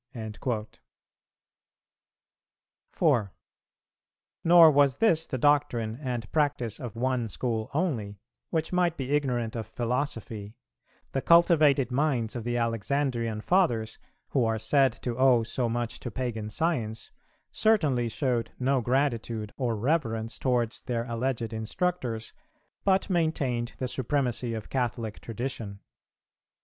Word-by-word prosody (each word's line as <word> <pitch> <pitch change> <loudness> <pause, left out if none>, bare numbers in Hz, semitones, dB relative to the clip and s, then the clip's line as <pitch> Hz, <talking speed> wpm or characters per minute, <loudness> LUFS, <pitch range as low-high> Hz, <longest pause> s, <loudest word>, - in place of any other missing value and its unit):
"[349:1] 110 0 -3 2.2
4. 100 -5 +1 1.1
Nor 165 -1 +8
was 140 -2 +4
this 165 -8 +3
the 130 - -3
doctrine 120 -5 +1
and 120 -6 -4
practice 145 -8 0
of 120 -4 -6
one 125 -1 0
school 110 0 -2
only, 125 - -1 0.3
which 160 +1 -2
might 175 -2 +2
be 135 0 -4
ignorant 125 -6 0
of 115 -2 -4
philosophy; 115 -4 -3 0.6
the 135 - -1
cultivated 155 -6 +5
minds 125 -5 0
of 120 - -4
the 120 +1 -1
Alexandrian 115 0 -1
Fathers, 115 - +1 0.3
who 130 - +2
are 115 -1 +1
said 130 +4 +3
to 120 -2 -2
owe 130 -3 +5
so 120 +1 -1
much 120 0 -3
to 120 - -5
Pagan 115 -3 -3
science, 110 -5 -2 0.4
certainly 145 - +2
showed 115 0 -1
no 130 0 +1
gratitude 115 -4 -1
or 120 -4 -1
reverence 115 -3 -1
towards 120 -3 0
their 115 -2 -2
alleged 115 -1 -2
instructors, 115 0 -2 0.5
but 195 -1 +2
maintained 155 - 0
the 130 - -2
supremacy 125 -2 -1
of 110 -1 -6
Catholic 120 -4 -2
Tradition. 115 -3 -5
120 Hz, 120 wpm, -28 LUFS, 115-140 Hz, 2.2 s, Nor